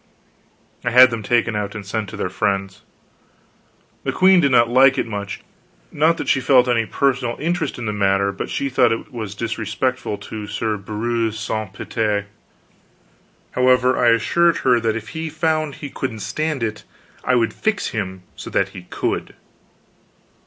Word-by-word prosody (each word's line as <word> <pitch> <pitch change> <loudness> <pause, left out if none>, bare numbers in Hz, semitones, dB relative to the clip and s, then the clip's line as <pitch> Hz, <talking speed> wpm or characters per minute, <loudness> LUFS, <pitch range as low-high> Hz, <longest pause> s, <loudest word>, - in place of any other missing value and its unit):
I 120 - 0
had 125 +1 +8
them 115 -1 -3
taken 115 +1 +1
out 105 0 -3
and 105 -1 -6
sent 105 +1 -3
to - - -8
their - - -1
friends. 95 -1 -2 1.2
The - - -1
queen 185 0 +5
did 140 -5 +3
not 120 -2 +5
like 130 +2 +5
it - - 0
much. 100 -4 -5 0.5
Not 160 +3 +2
that - - -5
she 135 - +2
felt 125 -1 +4
any 115 -2 +1
personal 130 -3 0
interest 165 -1 -2
in 120 - -5
the 105 - -2
matter, 100 -1 +2
but 100 - -6
she 140 - -2
thought 125 -2 +3
it 110 -3 -5
disrespectful 115 +1 -2
to 105 0 -7
Sir 105 +1 -2
Breuse 110 +2 -2
Sance 110 -2 -4 0.2
Pite. 105 -3 0 1.3
However, 125 0 +3
I 120 - +3
assured 165 +10 +3
her 125 -2 +5
that 110 -1 0
if 110 0 -6
he 160 +3 -4
found 155 -1 -1
he 145 - -8
couldn't 115 -5 -4
stand 155 -1 -2
it 105 -1 -3 0.4
I 125 - +2
would 115 -2 +1
fix 215 -1 -1
him 95 -4 -4
so - - -8
that 100 0 +1
he 90 -2 -11
could. - - -3
115 Hz, 165 wpm, -20 LUFS, 105-130 Hz, 1.3 s, had